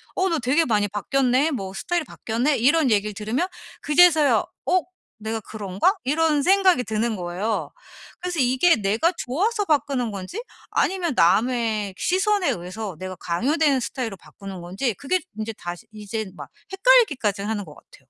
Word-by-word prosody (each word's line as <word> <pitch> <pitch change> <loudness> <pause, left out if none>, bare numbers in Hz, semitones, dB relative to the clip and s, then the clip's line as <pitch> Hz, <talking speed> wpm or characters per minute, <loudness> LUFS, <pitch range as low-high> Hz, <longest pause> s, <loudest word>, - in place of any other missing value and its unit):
어 375 0 +1
너 330 - 0
되게 270 +7 +2
많이 210 -3 +1
바뀌었네 260 +8 +1
뭐 195 -7 -4
스타일이 345 - -2
바뀌었네 245 +6 -1
이런 285 +2 +3
얘기를 210 0 +1
들으면 220 - -2 0.3
그제서야 310 -1 +5 0.3
'어 370 -1 +3 0.4
내가 220 +1 -3
그런가?' 205 - 0
이런 300 +1 +2
생각이 375 -6 +4
드는 220 +1 -1
거예요. 185 +5 -3 0.5
그래서 355 -2 -3
이게 260 +7 +4
내가 220 - +1
좋아서 410 - 0
바꾸는 275 - 0
건지 200 - -6 0.3
아니면 355 -6 0
남의 215 +1 +2
시선에 385 0 +1
의해서 185 +2 -4
내가 185 0 -6
강요되는 275 - +1
스타일로 235 -5 -4
바꾸는 195 +1 -10
건지 195 +8 -2
그게 345 +6 -1 0.2
인제 220 +1 -4
다시 175 0 -7
이제 215 +1 -5
막 - - -9 0.2
헷갈리기까지 385 - +3
하는 210 -1 -2
것 150 - -13
같아요. - - -19
245 Hz, 360 characters per minute, -23 LUFS, 205-325 Hz, 0.5 s, 그제서야